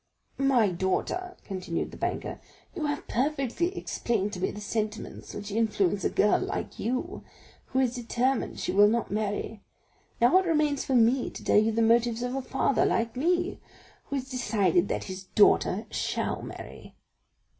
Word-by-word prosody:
"My 260 -6 +4
daughter," 190 - -2
continued 185 -4 -3
the - - -10
banker, - - -3 0.3
"you 315 -5 -2
have 290 0 -3
perfectly 295 - -1
explained 210 -3 -1
to 180 - -5
me - - +1
the 205 - -7
sentiments 215 +1 -4
which 205 0 -6
influence 205 -3 +1
a - - +2
girl 210 - +3
like - - -4
you, 255 - -3 0.4
who 260 - -1
is 250 -2 +1
determined 245 +1 -1
she - - -1
will 205 +2 +6
not 230 +2 0
marry; 210 0 -2 0.6
now 245 +8 +5
it 375 - -2
remains 300 -3 +2
for 265 - 0
me 240 +2 +4
to - - -10
tell - - +3
you 220 +1 +2
the 225 +1 +1
motives 235 +1 +3
of 245 0 -2
a 270 - -1
father 265 +1 +1
like 230 +1 0
me, 350 +6 0 0.5
who 280 - -4
has 265 -1 -3
decided 205 -8 +1
that - - -2
his 190 0 -7
daughter 205 +1 +3
shall - - -2
marry." - - -10
235 Hz, 165 wpm, -28 LUFS, 205-270 Hz, 0.6 s, will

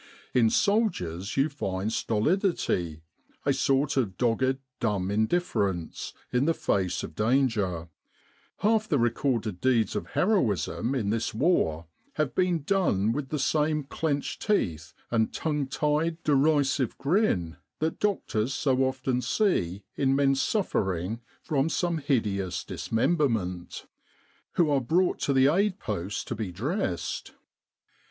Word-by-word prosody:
In 115 -3 +4
soldiers 110 - 0
you 135 +2 +4
find 105 -7 -3
stolidity, 110 - 0 0.4
a - - +3
sort 140 +1 +1
of 100 -8 0
dogged 130 +2 +1 0.2
dumb 100 -4 0
indifference, 105 - -1 0.2
in 125 +3 +3
the 165 +1 +2
face 95 -2 0
of - - -7
danger 105 -8 +1 0.7
half 215 +1 +2
the 150 - +3
recorded 115 -5 0
deeds 120 -6 +2
of - - -3
heroism 135 - +1
in 105 -6 0
this 115 -1 -1
war 95 - +1 0.3
have 150 -4 -1
been 180 -4 +1
done 140 - +2
with 135 +2 -3
the 155 - -1
same 150 +1 +1
clenched 145 +1 -2
teeth 85 - 0 0.2
and 110 -2 +2
tongue 150 -3 -1
tied, 150 +4 0
derisive 140 -3 +2
grin 135 - +1 0.2
that 160 +1 -2
doctors 135 - 0
so 135 -3 +1
often 130 -1 0
see 120 - 0
in 135 -1 +2
men 135 0 +3
suffering 110 - -1 0.2
from 145 0 +1
some 170 -1 0
hideous 100 - -1
dismemberment, 110 - -1 0.7
who 165 -4 +3
are 140 -2 +3
brought 175 +9 +1
to - - 0
the 135 -1 +4
aid 185 +6 +2
post 100 - -4
to - - -2
be 105 -4 -4
dressed. 110 - -3
130 Hz, 130 wpm, -27 LUFS, 100-155 Hz, 0.7 s, In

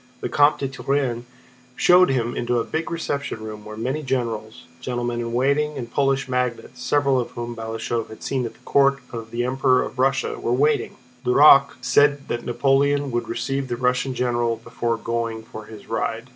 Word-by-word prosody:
The - - -3
Comte 145 +1 +4
de 135 - -2
Turenne 130 -3 -2 0.5
showed 180 +1 +5
him 120 -3 0
into 120 0 0
a - - 0
big 160 +1 -3
reception 140 -8 -3
room 105 -1 -7
where 110 0 -9
many 130 +7 -2
generals, 115 -5 -3 0.2
gentlemen 120 -1 -3
in 115 0 -3
waiting, 140 +4 +1
and 120 -3 -6
Polish 135 -2 +1
magnates—several 125 +2 0
of 120 - -3
whom 120 0 -4
Balashëv 115 0 -3
had 110 - -11
seen 130 -2 -1
at - - -10
the - - -23
court 140 0 +3
of 115 -1 -7
the 120 +1 -2
Emperor 130 0 +2
of 125 - -8
Russia—were 135 -2 0
waiting. 145 +4 +1 0.3
Duroc 140 +2 +6
said 145 +3 +3
that 120 - -2
Napoleon 140 +3 +1
would 120 0 -2
receive 135 +3 -2
the 120 -1 -3
Russian 125 +1 0
general 120 -2 0
before 115 +1 -3
going 115 -1 -3
for 110 -1 -10
his 105 -1 -12
ride. 115 +2 -3
125 Hz, 175 wpm, -23 LUFS, 115-135 Hz, 0.5 s, Duroc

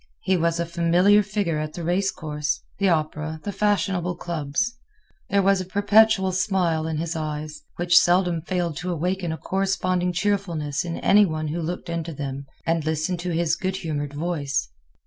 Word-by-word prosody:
He 190 - +2
was 170 -1 +1
a 170 - 0
familiar 175 +5 +4
figure 195 -6 -1
at 155 0 -4
the 175 - -6
race 185 +4 +1
course, 150 -3 -3 0.2
the 200 -1 +3
opera, 155 -1 -1
the 205 - -3
fashionable 195 -3 0
clubs. 170 +8 -2 0.5
There 200 -1 +3
was 195 0 +3
a - - -3
perpetual 205 0 +4
smile 180 -4 +1
in 160 -1 -2
his 165 +1 -3
eyes, 150 -1 -4
which 175 0 +5
seldom 175 -1 +2
failed 175 -3 -2
to 180 +3 -3
awaken 175 +1 -1
a 160 - -3
corresponding 185 -1 0
cheerfulness 175 -7 -1
in 170 -1 -4
any 205 0 +5
one 155 -2 -3
who 170 +3 -2
looked 175 +2 -4
into 170 -1 -3
them 140 0 -5 0.2
and 165 -1 +1
listened 160 +3 -1
to 180 +1 -3
his 170 -1 +1
good 185 +2 -2
humored 145 -5 -4
voice. 145 - -2
170 Hz, 175 wpm, -24 LUFS, 155-190 Hz, 0.5 s, which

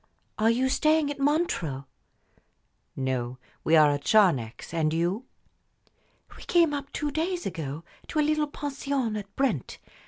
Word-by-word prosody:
Are 220 +1 +4
you 250 +3 +2
staying 305 +2 +2
at 285 - -7
Montreux?" 275 - 0 1.1
"No; 130 -2 -2 0.3
we 160 - +4
are 150 -2 +6
at 145 0 -2
Charnex 165 - +2
and 160 -2 +1
you?" 180 +9 -1 1.1
"We - - -13
came 335 -4 +3
up 280 -1 -4
two 295 -1 -2
days 345 +4 -2
ago 160 -4 -4 0.2
to - - -5
a 300 - +3
little 305 -1 +1
pension 275 -5 -2
at 200 -1 -7
Brent. 250 - -1
225 Hz, 145 wpm, -27 LUFS, -, 1.1 s, are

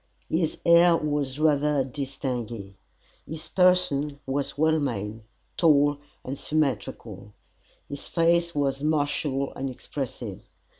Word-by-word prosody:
His 160 -1 0
air 170 0 +6
was 145 -3 -2
rather 150 -2 +2
distingué. 125 -6 -5 0.5
His 160 0 -7
person 165 -6 +3
was 140 +1 -2
well 160 +1 +3
made, 110 -5 -3 0.4
tall 145 -3 +4 0.3
and 135 +2 -5
symmetrical. 115 -8 -2 0.5
His 140 0 -7
face 170 0 +2
was 140 -1 0
martial 145 -2 0
and 135 0 -3
expressive. 125 -6 -6
145 Hz, 105 wpm, -26 LUFS, 130-155 Hz, 0.5 s, air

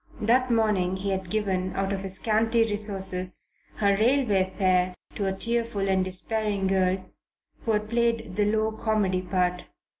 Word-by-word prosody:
That 250 +4 +2
morning 210 -6 +1
he 195 +1 -2
had 190 -2 -3
given, 190 -3 -1
out 195 0 -1
of 195 - -3
his 190 -1 -3
scanty 225 +2 +2
resources, 195 -4 +1 0.4
her 200 -1 +2
railway 215 -4 +2
fare 185 -1 +1 0.2
to 200 - -2
a - - +1
tearful 230 0 0
and 190 -1 +2
despairing 200 +2 -1
girl 190 -1 +2 0.7
who 220 -2 +2
played 230 -2 -1
the 205 +1 +2
low 220 +1 +1
comedy 215 -4 0
part. 180 -1 -1
200 Hz, 150 wpm, -26 LUFS, 185-220 Hz, 0.7 s, That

